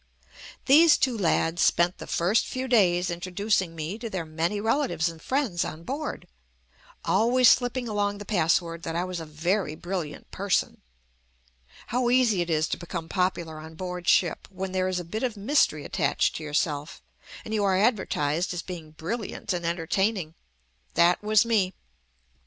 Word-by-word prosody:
These 305 +3 +7
two 255 -3 +1
lads 170 -4 +1
spent 175 +1 +3
the - - -8
first 185 +7 +1
few 260 0 -4
days 185 -7 +3
in 170 - -4
troducing 185 -1 -1
me 165 +7 -5
to 230 -1 -5
their 185 -5 -4
many 165 +6 -2
relatives 220 - +1
and 165 -1 -11
friends 255 -11 0
on 160 +2 -6
board, 285 - -5 0.8
always 245 +2 +4
slipping 245 0 +2
along 205 -1 -1
the 205 - -8
password 170 -3 +1
that 165 -1 -4
I 175 - 0
was 185 -1 -4
a 160 - -7
very 160 +2 -1
brilliant 175 -4 -5
person. 195 -1 -1 1.1
How 245 0 +2
easy 240 -7 +3
it 175 - -3
is 155 -1 +1
to - - -2
become 170 -1 -6
popular 175 -4 -1
on 160 +1 -10
board 180 0 -6
ship 175 -3 +2
when 190 -1 -5
there 185 0 0
is 185 -1 -1
a - - -5
bit 215 +7 -5
of 240 -4 -2
mystery 200 - +2
attached - - 0
to 160 - -7
yourself 150 0 -2 0.4
and 220 - -5
you 210 -2 +1
are 190 -2 +3
advertised 185 - +1
as 170 - -4
being 165 -4 -8
brilliant 190 +4 -4
and 175 -1 -3
entertaining. 175 +1 -1 0.6
That 170 +1 +4
was 215 +1 +4
me. 205 -5 +1
185 Hz, 170 wpm, -26 LUFS, 165-215 Hz, 1.1 s, These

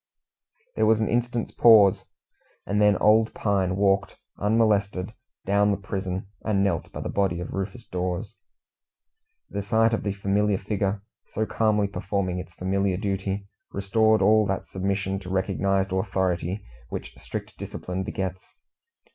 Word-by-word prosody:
There - - +2
was 110 -1 +4
an 110 - +1
instant's 120 0 -1
pause, 105 -5 +6 0.6
and 105 +2 0
then 105 -2 +5
old 110 +1 +4
Pine 95 -3 +1
walked, 100 0 +1 0.2
unmolested, 105 -3 +1 0.3
down 100 +1 +3
the 100 - +1
prison 95 -2 -4 0.2
and 100 -3 +1
knelt 90 -5 -1
by - - -6
the - - -4
body 95 -4 0
of 90 - -6
Rufus 105 +5 -4
Dawes. 90 +4 -3 1.2
The 100 - -2
sight 110 +2 +2
of 115 - 0
the 100 - -2
familiar 100 +1 +1
figure, 100 0 -2 0.3
so 110 - 0
calmly 105 -2 +1
performing 100 -2 -2
its 90 -1 -9
familiar 95 0 0
duty, 100 0 -2 0.2
restored 110 +3 +2
all 110 -1 +5
that 95 -1 -2
submission 95 0 -2
to 90 -2 -9
recognized 95 0 0
authority 95 -1 -1 0.2
which - - -6
strict - - -7
discipline 90 +1 -5
begets. 95 -1 -5
100 Hz, 140 wpm, -25 LUFS, 95-105 Hz, 1.2 s, pause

